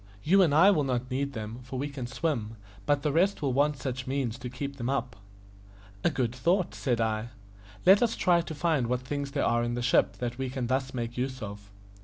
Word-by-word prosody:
You 195 +5 +5
and 170 -5 +4
I 170 +8 +7
will 155 -7 +2
not 125 -1 -2
need 140 +2 -1
them, 110 0 -6
for 125 +1 -7
we 140 +3 -2
can 140 -4 -6
swim, 120 -5 -2 0.3
but 145 -1 +2
the 150 - +1
rest 180 +3 +2
will 135 -3 +1
want 145 +3 +2
some 130 - -14
such 125 0 -6
means 130 -3 -2
to 125 -1 -5
keep 140 +3 -5
them 120 -1 -3
up." 125 -4 -1 0.9
"A - - +4
good 125 -5 -1
thought," 170 +8 +1
said 120 -4 -1
I. 110 0 -1 0.6
"Let 195 +3 +7
us 235 -2 +2
try 175 -1 +3
to 165 -2 -7
find 150 -5 +1
what 125 +1 0
things 140 +2 -3
there 140 0 -1
are 120 0 +2
in 120 0 -1
the 120 - -2
ship 125 - +3
that 120 0 -4
we 130 -1 -2
can 130 -1 -3
thus 130 +1 -1
make 120 0 -4
use 130 -1 -3
of." 100 -1 -8
130 Hz, 235 wpm, -28 LUFS, 120-145 Hz, 0.9 s, I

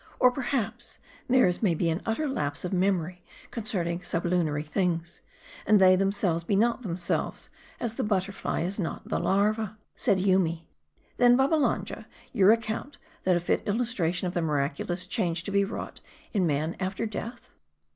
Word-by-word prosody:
Or, 250 - +6
perhaps, 240 -3 -3 0.3
theirs 250 -9 +3
may 185 -7 +2
be 170 - 0
an 160 - -2
utter 260 +8 0
lapse 145 - -2
of 180 - -3
mem 190 0 +3
ory 180 +2 -9 0.3
concerning 180 -6 -2
sublunary 170 -4 0
things; 170 +1 -2 0.5
and 210 0 +6
they 185 -1 +7
themselves 195 -3 0
be 195 - 0
not 235 +4 +2
themselves, 175 -5 -2 0.3
as 235 -2 -2
the - - -2
butterfly 195 -1 -1
is 185 +5 -3
not 175 - -4
the - - 0
larva." 215 +2 +1 0.2
Said 190 - +2
Yoomy, 180 -4 +1 0.2
" - - -37
'Then, 245 0 +6
Babbalanja, 280 +2 +1 0.3
you 195 -1 +5
account 230 +5 0 0.3
that 185 -1 +4
a - - +2
fit 175 - 0
illustration 205 -6 0
of 175 - -4
the 175 - 0
miraculous 150 +4 -1
change 170 -2 -1
to 200 - -5
be 200 0 +3
wrought 200 - -6 0.3
in 190 -5 +2
man 155 +2 -1
after 190 +3 -2
death 230 +2 -6
190 Hz, 165 wpm, -27 LUFS, 170-220 Hz, 0.5 s, they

